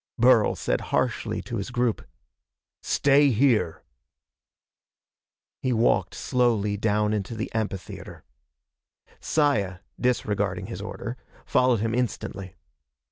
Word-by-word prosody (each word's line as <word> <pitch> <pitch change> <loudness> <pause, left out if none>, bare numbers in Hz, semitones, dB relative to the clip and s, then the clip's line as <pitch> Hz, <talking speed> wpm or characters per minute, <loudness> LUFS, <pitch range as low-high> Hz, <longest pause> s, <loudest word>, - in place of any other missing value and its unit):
Burl 120 -2 +5
said - - -1
harshly - - -1
to 115 - -4
his 100 - -4
group: 120 -2 0 0.8
"Stay 140 +1 +4
here!" 115 - +2 1.8
He 130 - 0
walked 115 0 +2
slowly 115 -5 +1
down 105 0 +1
into 105 +2 -3
the 110 +2 -5
amphitheater. 105 -4 -5 1.0
Saya, 100 -12 +1 0.2
disregarding 120 -4 0
his - - -6
order, - - -6 0.3
followed 125 -4 +3
him 115 0 -1
instantly. 100 -6 -3
115 Hz, 100 wpm, -25 LUFS, 105-125 Hz, 1.8 s, Burl